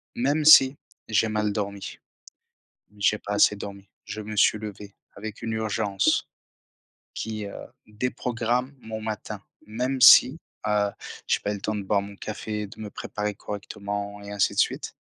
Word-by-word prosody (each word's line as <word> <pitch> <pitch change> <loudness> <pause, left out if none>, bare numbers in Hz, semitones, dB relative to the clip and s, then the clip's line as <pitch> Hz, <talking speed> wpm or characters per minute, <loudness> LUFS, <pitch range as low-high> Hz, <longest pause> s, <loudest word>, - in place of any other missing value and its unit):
même 145 +5 +1
si 135 -3 +8 0.3
j'ai 110 +1 +2
mal 105 -1 0
dormi, 100 -1 -4 1.0
j'ai 100 +1 +2
pas 105 -1 -5
assez 105 0 +5
dormi, 100 -1 -8 0.2
je 110 - -6
me 105 0 -6
suis 105 +1 +4
levé 105 -1 -8 0.2
avec 110 +1 -8
une 115 - -3
urgence 110 - 0 0.9
qui, 110 -2 -4
heu, 100 - -8 0.3
déprogramme 120 +3 -2
mon 110 -1 -6
matin. 110 -1 -5 0.2
Même 125 +5 -2
si, 125 +3 +9 0.3
heu, 105 -1 +2 0.4
j'ai - - +1
pas 105 - -2
eu - - -3
le 100 - -7
temps 110 - -2
de 105 - -3
boire 100 +1 +1
mon 100 0 -10
café, 105 0 -5
de 100 - -13
me 105 -1 -6
préparer 105 0 -4
correctement 100 0 -6
et 100 - -9
ainsi 100 -1 +1
de - - -8
suite. - - 0
105 Hz, 165 wpm, -25 LUFS, 100-110 Hz, 1.0 s, si